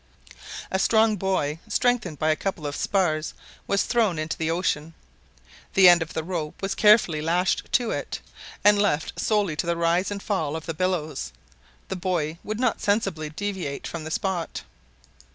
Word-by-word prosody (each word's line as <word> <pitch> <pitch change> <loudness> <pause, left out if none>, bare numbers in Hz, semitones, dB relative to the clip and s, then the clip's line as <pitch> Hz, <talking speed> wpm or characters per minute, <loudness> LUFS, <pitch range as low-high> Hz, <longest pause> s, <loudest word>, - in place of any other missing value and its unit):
A 190 - +1
strong 220 +1 +4
buoy, 180 -6 -1
strengthened 215 -7 +1
by 155 +2 +2
a - - +2
couple 175 -3 -4
of 145 0 -3
spars, 160 -6 0 0.3
was 200 - +2
thrown 220 -8 +1
into 155 0 -2
the 160 0 -2
ocean. 165 -2 -1 0.8
The 190 -1 +8
end 175 -1 +7
of 160 - -4
the 160 - -1
rope 160 -3 -4
was 195 0 -2
carefully 210 -8 +4
lashed 175 +4 0
to 240 -2 +2
it; - - -4 0.4
and, 205 0 +6
left 160 -7 0
solely 205 -7 +1
to 170 - -1
the 170 0 0
rise 170 +3 +1
and 200 -1 -5
fall 160 -8 -1
of 160 - -6
the 165 - -3
billows, 155 - -2 0.6
the - - -3
buoy 170 -4 -2
would 215 +1 -4
not 250 -3 +1
sensibly 195 -7 0
deviate 180 -4 -4
from 170 -2 -5
the 155 - -6
spot. 175 0 -2
175 Hz, 170 wpm, -25 LUFS, 155-200 Hz, 0.8 s, The